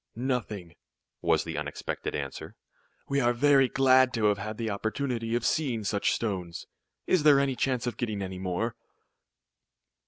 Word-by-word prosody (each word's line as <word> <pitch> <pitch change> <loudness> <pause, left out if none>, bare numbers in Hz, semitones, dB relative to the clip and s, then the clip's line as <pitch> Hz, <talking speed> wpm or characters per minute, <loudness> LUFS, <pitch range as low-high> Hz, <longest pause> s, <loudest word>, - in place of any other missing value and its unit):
"Nothing," 110 -8 -3 0.5
was - - +2
the - - -4
unexpected - - -4
answer. - - -6 0.5
"We 140 - +1
are 120 -1 +3
very 135 +1 +4
glad 130 -1 +4
to 110 -2 +1
have 100 -1 0
had 110 +2 -5
the 115 -2 -2
opportunity 115 +2 -2
of 120 - -1
seeing 130 -8 0
such 100 0 +1
stones. 90 -7 -3 0.4
Is 185 - +3
there 145 -2 +6
any 140 -2 +1
chance 125 -1 0
of 120 -3 -3
getting 105 -4 -2
any 95 -1 -6
more?" 95 +5 -2
115 Hz, 155 wpm, -28 LUFS, 105-130 Hz, 0.5 s, there